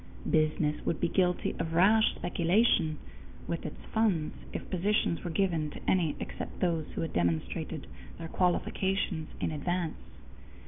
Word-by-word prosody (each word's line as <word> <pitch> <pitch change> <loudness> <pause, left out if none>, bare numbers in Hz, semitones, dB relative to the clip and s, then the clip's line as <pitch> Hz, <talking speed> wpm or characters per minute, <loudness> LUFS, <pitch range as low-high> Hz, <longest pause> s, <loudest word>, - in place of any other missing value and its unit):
Business 155 -1 +2
would 165 - -1
be 175 - +2
guilty 180 0 +1
of 165 - -2
rash 210 +6 +5
speculation 175 -2 +2 0.5
with 170 - -2
its - - -8
funds 200 -9 +2 0.2
if - - -5
positions 190 -1 +1
were 175 - -3
given 165 -3 +1
to - - -9
any 170 -5 +2
except - - -6
those 165 -4 +1
who - - -1
had 165 - -3
demonstrated 85 -2 -1 0.3
their 165 - -6
qualifications 180 -1 0
in - - -1
advance. 170 +2 -2
170 Hz, 140 wpm, -30 LUFS, 155-185 Hz, 0.5 s, rash